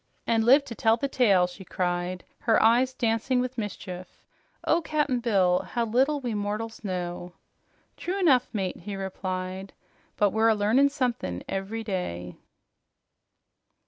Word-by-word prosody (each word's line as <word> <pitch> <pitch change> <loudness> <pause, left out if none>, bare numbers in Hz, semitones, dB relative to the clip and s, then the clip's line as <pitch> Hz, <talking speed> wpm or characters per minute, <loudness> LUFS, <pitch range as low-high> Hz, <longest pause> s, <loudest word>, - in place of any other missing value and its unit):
"An' 225 -1 +2
lived 270 +5 +5
to 240 - -7
tell 225 0 +3
the 280 - -1
tale!" 205 -9 +4
she 180 +2 -9
cried, 180 0 -2 0.2
her 225 -2 +3
eyes 240 +3 +4
dancing 245 0 0
with 255 +1 -2
mischief. 185 -3 -6 0.5
"Oh, 335 +2 +3
Cap'n 295 -5 0
Bill, 190 -6 +3
how 235 -1 -2
little 265 +6 +2
we 245 -4 -3
mortals 210 +2 -4
know!" 180 -2 -4 0.6
"True 375 +3 -3
enough, 275 -10 +4
mate," 195 -4 -2
he 200 +3 -6
replied, 190 0 -5 0.4
"but 205 -1 +3
we're 220 +2 +3
a 220 - +4
learnin' 225 +7 +3
something 245 - -2
ev'ry 200 +4 -3
day." 90 - -4
220 Hz, 145 wpm, -27 LUFS, 185-250 Hz, 0.6 s, lived